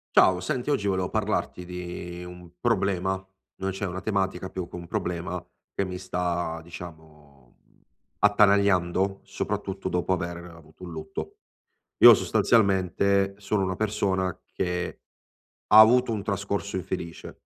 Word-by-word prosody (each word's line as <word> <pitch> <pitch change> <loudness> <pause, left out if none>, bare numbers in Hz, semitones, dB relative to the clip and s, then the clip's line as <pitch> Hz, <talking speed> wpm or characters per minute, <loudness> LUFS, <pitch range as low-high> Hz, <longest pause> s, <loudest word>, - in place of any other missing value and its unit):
Ciao. 95 -1 +6
Senti 130 +1 -2
oggi 140 -8 +1
volevo 95 -2 0
parlarti 105 -4 -2
di 90 0 -7
un 90 -1 -11
problema, 100 -5 +1 0.4
non 95 0 -3
c'è 95 +1 -3
una 90 +1 -4
tematica, 95 -2 -1
più 90 -2 -5
che - - -9
un 85 -1 -7
problema 90 -1 -3 0.3
che 100 - -1
mi 90 -1 -5
sta 85 -2 -2
diciamo, 80 -6 -13
mhmm, - - -31 0.5
attanagliando 100 -2 +3
soprattutto 95 -1 -3
dopo 90 +1 0
avere 85 -1 -3
avuto 85 0 -14
un 85 - -8
lutto. 80 -1 -7 0.6
Io - - +11
sostanzialmente 100 -2 +2
sono 105 0 -1
una 95 -1 -1
persona 95 -4 0 0.2
che 90 -1 -2 0.7
ha 105 - +8
avuto 120 +2 +6
un 105 -3 -2
trascorso 100 -1 -2
infelice. 85 -2 -6
95 Hz, 135 wpm, -26 LUFS, 85-100 Hz, 0.7 s, Io